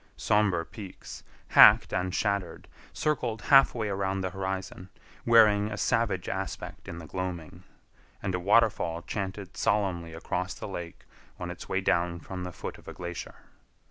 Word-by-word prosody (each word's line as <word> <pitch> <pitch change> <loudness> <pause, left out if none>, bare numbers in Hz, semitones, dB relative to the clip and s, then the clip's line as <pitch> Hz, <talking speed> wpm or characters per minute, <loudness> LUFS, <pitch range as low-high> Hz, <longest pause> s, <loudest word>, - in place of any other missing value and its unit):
Somber 100 -6 +2
peaks, 100 -4 -10 0.3
hacked - - +7
and 90 0 0
shattered, 100 -2 -2 0.2
circled 125 -7 -2
half 135 -2 +7
way 110 -3 -2
around 95 -1 -1
the 95 -1 -2
horizon, 95 -1 -5 0.4
wearing 105 -3 +6
a 100 - -4
savage 105 -7 0
aspect 95 0 -5
in 85 - -6
the 85 - -8
gloaming, 90 0 -5 0.6
and 95 -2 -3
a 90 - 0
waterfall 95 -4 +2
chanted 95 -1 -5
solemnly 90 -5 0
across 90 +2 -3
the - - -7
lake 85 -4 -7 0.3
on - - -4
its - - -10
way - - 0
down 85 0 +1
from 90 +2 -7
the 90 - -5
foot - - -7
of - - -20
a - - -7
glacier. 85 -3 -7
95 Hz, 155 wpm, -28 LUFS, 90-105 Hz, 0.6 s, hacked